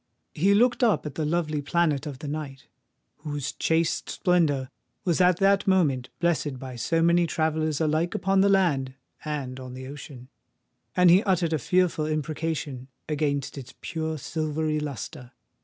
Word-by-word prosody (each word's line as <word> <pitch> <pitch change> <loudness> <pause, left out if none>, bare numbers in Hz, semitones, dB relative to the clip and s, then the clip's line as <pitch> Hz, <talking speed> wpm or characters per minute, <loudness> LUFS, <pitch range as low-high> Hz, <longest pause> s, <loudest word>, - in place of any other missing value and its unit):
He 195 +6 +3
looked 240 +3 +3
up 225 -8 +3
at 150 - -5
the 155 +1 -2
lovely 155 -2 0
planet 150 -1 +1
of 140 -3 -6
the 150 +2 -7
night, 140 -3 -5 0.5
whose 145 -2 -4
chaste 165 0 0
splendour 155 -8 +1 0.3
was 175 0 +2
at 180 -1 +5
that 195 +1 +3
moment 145 -10 +2
blessed 160 -6 0
by 130 -1 -8
so 165 +7 0
many 170 0 +4
travellers 155 -2 0
alike 160 +2 0
upon 195 0 +2
the 200 - +4
land 145 -10 +2 0.3
and 140 -4 -4
on 130 -1 -8
the 130 0 -7
ocean; 135 -2 -10 0.7
and 180 -1 +6
he 185 +3 +6
uttered 180 -5 +1
a 155 - +1
fearful 180 -1 +1
imprecation 155 -3 -3 0.2
against 145 -2 -1
its 130 -1 -11
pure 160 -1 -3
silvery 155 0 -2
lustre. 130 -3 -6
155 Hz, 155 wpm, -26 LUFS, 140-170 Hz, 0.7 s, and